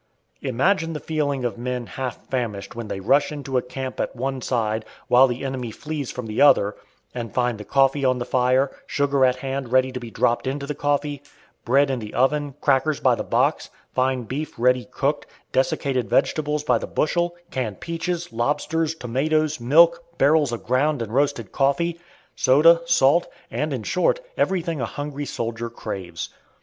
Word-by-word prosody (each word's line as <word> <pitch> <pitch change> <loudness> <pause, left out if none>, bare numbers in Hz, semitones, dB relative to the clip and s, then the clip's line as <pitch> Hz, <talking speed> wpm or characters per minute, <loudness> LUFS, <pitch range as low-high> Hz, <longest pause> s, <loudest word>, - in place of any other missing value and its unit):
Imagine 165 +6 +1
the 150 - -4
feelings 145 -5 -1
of 120 -1 -3
men 125 0 -3
half 130 0 -6
famished 115 -6 -3
when 115 -2 -5
they 95 - -4
rush 140 +9 +2
into 135 -3 -1
a - - -4
camp 130 +1 -6
at - - -2
one 130 +1 -3
side, 110 -3 -1 0.2
while 130 +2 +6
the 125 +2 -4
enemy 130 -3 -3
flees 150 +3 -5
from 125 - -6
the 110 -1 -2
other, 105 -8 +5 0.4
and 115 -3 -6
find 125 -3 +1
the - - -6
coffee 135 +3 +2
on 130 -1 +3
the 120 - -3
fire, 130 +2 +2 0.2
sugar 140 -1 +1
at 130 -1 +4
hand 135 -1 -4
ready 130 0 +3
to 125 - -5
be 120 -2 -8
dropped 120 +3 0
into 140 +1 -2
the 150 - -3
coffee, 145 0 -1 0.4
bread 135 +3 +3
in 130 - -1
the 105 -2 -8
oven, 145 +1 +1
crackers 140 +2 +2
by - - +4
the - - -2
box, - - +1 0.2
fine 130 -1 +1
beef 140 +7 -5
ready 125 +1 +2
cooked, 140 +3 -2 0.2
desiccated 135 -2 0
vegetables 150 +2 +1
by 125 -5 +2
the - - -5
bushel, 175 +2 0 0.2
canned 115 -7 -3
peaches, 170 -2 -3
lobsters, 155 +6 0
tomatoes, 155 +4 0
milk, 170 +7 +5
barrels 145 -1 +4
of 120 - -5
ground 130 +1 +1
and 110 0 -8
roasted 140 -5 0
coffee, 170 +5 +1 0.4
soda, - - +5
salt, - - +4 0.2
and - - -2
in - - -3
short - - +1 0.2
everything 170 -6 0
a - - 0
hungry 145 +3 -5
soldier 115 0 -3
craves. 85 -8 -6
135 Hz, 175 wpm, -23 LUFS, 125-150 Hz, 0.4 s, while